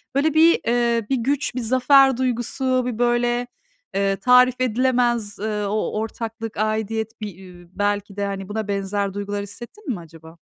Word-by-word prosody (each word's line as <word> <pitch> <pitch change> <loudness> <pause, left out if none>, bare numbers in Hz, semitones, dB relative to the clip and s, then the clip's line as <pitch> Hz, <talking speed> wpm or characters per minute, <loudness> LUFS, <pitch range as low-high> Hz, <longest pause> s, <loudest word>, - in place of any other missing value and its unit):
Böyle 300 +2 +2
bir, 325 +2 +5
eee, 235 -1 +1
bir 270 - +2
güç, 270 +2 -1
bir 255 - -2
zafer 260 +2 +4
duygusu, 255 +1 0
bir 245 -3 -3
böyle, 240 0 +1 0.5
eee, 195 0 +1
tarif 250 +4 +4
edilemez, 240 -3 +1
eee, 210 0 -2
o 215 +2 -1
ortaklık, 225 0 -5
aidiyet, 220 +1 -2
bir, 210 - -3
iii, 180 -2 -14
belki 205 -1 -1
de 195 -1 -3
buna 215 0 -3
benzer 200 0 -2
duygular 205 0 -3
hissettin 240 - -10
mi 185 - -6
acaba? 165 0 -14
225 Hz, 155 wpm, -22 LUFS, 205-250 Hz, 0.5 s, bir